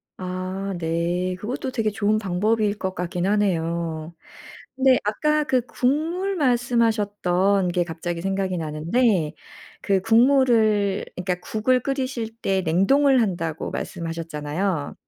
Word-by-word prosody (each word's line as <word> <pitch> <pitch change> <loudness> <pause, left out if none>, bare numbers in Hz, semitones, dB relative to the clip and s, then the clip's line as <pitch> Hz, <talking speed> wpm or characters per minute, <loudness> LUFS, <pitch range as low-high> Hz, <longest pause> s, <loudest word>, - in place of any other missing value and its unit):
아 185 +1 -4
네. 170 +2 -1
그것도 245 +6 -4
되게 225 -4 0
좋은 210 +1 +1
방법일 210 +2 0
것 190 -1 -3
같기는 180 +1 -2
하네요. 170 -5 -1 0.6
근데 265 -1 +4
아까 300 +9 +1
그 260 -3 +1
국물 325 +11 -1
말씀하셨던 210 - +1
게 175 0 +1
갑자기 170 +1 -5
생각이 195 -1 -1
나는데 165 +3 +1 0.5
그 195 -2 +2
국물을 225 -3 +3
그러니까 180 0 -1
"국을 225 +7 +1
끓이실 255 -4 -3
때 195 -4 0
냉동을 260 - +3
한다."고 165 -7 -2
말씀하셨잖아요. 165 0 -3
200 Hz, 270 characters per minute, -23 LUFS, 175-235 Hz, 0.6 s, 근데